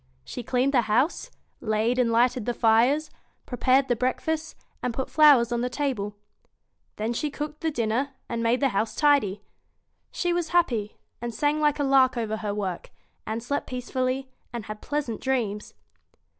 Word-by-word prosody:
She -, -, -6 dB
cleaned 255 Hz, +4 st, 0 dB
the 250 Hz, -, +5 dB
house, 255 Hz, +10 st, +1 dB, 0.3 s
laid 220 Hz, +3 st, 0 dB
and 235 Hz, -2 st, +2 dB
lighted 240 Hz, 0 st, +2 dB
the 240 Hz, -, 0 dB
fires, 245 Hz, +8 st, +3 dB, 0.3 s
prepared 260 Hz, +2 st, +2 dB
the 245 Hz, -, +2 dB
breakfast, 310 Hz, +6 st, -2 dB, 0.3 s
and 245 Hz, -2 st, -2 dB
put 265 Hz, -, -3 dB
flowers 280 Hz, -7 st, +6 dB
on 240 Hz, 0 st, 0 dB
the 250 Hz, -, -1 dB
table. 245 Hz, -7 st, -2 dB, 0.8 s
Then 220 Hz, +3 st, -2 dB
she 295 Hz, +5 st, -1 dB
cooked 300 Hz, +1 st, -6 dB
the 325 Hz, -, +1 dB
dinner, 240 Hz, 0 st, -1 dB, 0.2 s
and 230 Hz, 0 st, -3 dB
made 230 Hz, +3 st, +1 dB
the 275 Hz, -, +3 dB
house 220 Hz, 0 st, -1 dB
tidy. 225 Hz, -10 st, +2 dB, 0.7 s
She 350 Hz, -1 st, -1 dB
was 345 Hz, -2 st, -1 dB
happy, 240 Hz, -12 st, +1 dB, 0.2 s
and 240 Hz, 0 st, -3 dB
sang 295 Hz, +5 st, +1 dB
like 295 Hz, -1 st, +3 dB
a 290 Hz, -, 0 dB
lark 265 Hz, -2 st, +4 dB
over 220 Hz, -2 st, -2 dB
her 210 Hz, -1 st, -3 dB
work, 195 Hz, -4 st, -4 dB, 0.4 s
and 220 Hz, +1 st, -3 dB
slept 280 Hz, +4 st, -2 dB
peacefully, 255 Hz, +1 st, -2 dB, 0.2 s
and 235 Hz, -3 st, -5 dB
had 215 Hz, 0 st, -7 dB
pleasant 290 Hz, -6 st, -3 dB
dreams. 225 Hz, -6 st, -2 dB
250 Hz, 170 wpm, -26 LUFS, 225-285 Hz, 0.8 s, flowers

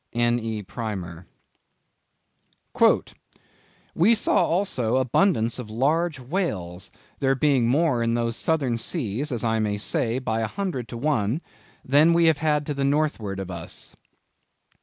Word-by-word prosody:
—N. 120 Hz, 0 st, +2 dB
E. 110 Hz, -2 st, -4 dB
Primer. 95 Hz, -4 st, -6 dB, 2.7 s
"We 210 Hz, +8 st, +4 dB
saw -, -, +2 dB
also 135 Hz, -, 0 dB
abundance 130 Hz, -, +2 dB
of 115 Hz, -4 st, -7 dB
large 145 Hz, +7 st, 0 dB
whales, 115 Hz, -, -3 dB, 0.3 s
there 135 Hz, -1 st, +2 dB
being 135 Hz, -4 st, +2 dB
more 140 Hz, -1 st, +2 dB
in 115 Hz, 0 st, +1 dB
those 115 Hz, -1 st, -1 dB
southern 135 Hz, -7 st, 0 dB
seas, 135 Hz, -, -2 dB
as 120 Hz, -2 st, -3 dB
I 115 Hz, -1 st, +1 dB
may 105 Hz, -1 st, 0 dB
say, 115 Hz, +3 st, 0 dB
by 115 Hz, -4 st, -2 dB
a 110 Hz, -, 0 dB
hundred 170 Hz, -, -4 dB
to 120 Hz, -, -7 dB
one; 120 Hz, -2 st, 0 dB, 0.5 s
than 150 Hz, +5 st, +5 dB
we 170 Hz, 0 st, +4 dB
have 150 Hz, -1 st, +2 dB
to 145 Hz, -, -3 dB
the 140 Hz, -1 st, -2 dB
northward 140 Hz, -9 st, 0 dB
of 95 Hz, -1 st, -5 dB
us." 85 Hz, -1 st, -6 dB
125 Hz, 140 wpm, -24 LUFS, 110-150 Hz, 2.7 s, than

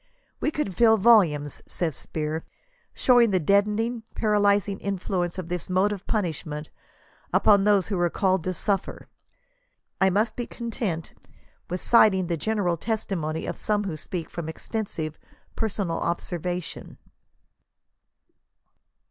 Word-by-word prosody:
"We -, -, +1 dB
could 300 Hz, -11 st, -2 dB
fill 225 Hz, +1 st, +5 dB
volumes," 180 Hz, -, +4 dB
says 160 Hz, -5 st, -2 dB
Spear, 155 Hz, +1 st, -3 dB, 0.5 s
shdwing 245 Hz, -2 st, +5 dB
the 190 Hz, -2 st, +2 dB
deadening, 210 Hz, +6 st, +1 dB
paralyzing 205 Hz, -2 st, +2 dB
influence 185 Hz, -2 st, -2 dB
of 185 Hz, -3 st, -5 dB
this 180 Hz, +1 st, -4 dB
mode 190 Hz, +3 st, +2 dB
of 200 Hz, -2 st, -6 dB
punishment 160 Hz, -7 st, -3 dB, 0.6 s
upon 200 Hz, -2 st, +5 dB
those 205 Hz, -2 st, +3 dB
who 195 Hz, -4 st, -1 dB
are 175 Hz, 0 st, +2 dB
called 190 Hz, -1 st, +1 dB
to 185 Hz, -, -1 dB
suffer." 200 Hz, +2 st, -2 dB, 0.9 s
I 190 Hz, -, +5 dB
must 215 Hz, +4 st, +1 dB
be 240 Hz, -, -4 dB
content 220 Hz, -8 st, -4 dB, 0.6 s
with 180 Hz, +1 st, -3 dB
citing 210 Hz, -5 st, +5 dB
the 170 Hz, -1 st, -1 dB
general 185 Hz, 0 st, 0 dB
testimony 170 Hz, -7 st, -2 dB
of -, -, -5 dB
some 210 Hz, -1 st, 0 dB
who 190 Hz, -6 st, -3 dB
speak 165 Hz, +2 st, -5 dB
from 170 Hz, -2 st, -5 dB
extensive 160 Hz, -4 st, -4 dB, 0.4 s
personal 200 Hz, -6 st, -1 dB
observation. 175 Hz, 0 st, -4 dB
190 Hz, 125 wpm, -25 LUFS, 170-210 Hz, 0.9 s, fill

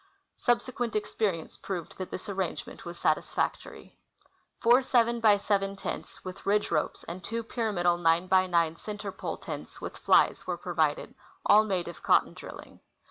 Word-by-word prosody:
Subse(i[uent 240 Hz, -1 st, 0 dB
experience 210 Hz, -5 st, -1 dB
proved 180 Hz, -3 st, -6 dB
that 185 Hz, -, -4 dB
this 185 Hz, -, -7 dB
arrangement 190 Hz, -3 st, -4 dB
was 170 Hz, 0 st, -7 dB
satis 155 Hz, -, 0 dB
factory. -, -, -3 dB, 0.6 s
Four 240 Hz, +2 st, +6 dB
seven 235 Hz, -2 st, +2 dB
by 215 Hz, -3 st, +5 dB
seven 200 Hz, -1 st, 0 dB
tents, 195 Hz, -, -6 dB
with 185 Hz, +1 st, -7 dB
ridge 210 Hz, +1 st, +1 dB
ro|)es, 155 Hz, -3 st, -1 dB
and 175 Hz, +2 st, -6 dB
two 230 Hz, +1 st, -2 dB
pyram 225 Hz, -4 st, -2 dB
idal 175 Hz, 0 st, +3 dB
nine 165 Hz, +1 st, +3 dB
by 185 Hz, 0 st, +4 dB
nine 170 Hz, -2 st, +2 dB
center 205 Hz, 0 st, -6 dB
pole -, -, -5 dB
tents, -, -, -7 dB
with -, -, -8 dB
iiies, -, -, +4 dB
were -, -, -1 dB
provided, -, -, 0 dB, 0.3 s
all 215 Hz, +1 st, +7 dB
made 185 Hz, -4 st, -1 dB
of 170 Hz, -, -8 dB
cotton -, -, +3 dB
drilling. -, -, -11 dB
195 Hz, 165 wpm, -29 LUFS, 175-225 Hz, 0.6 s, all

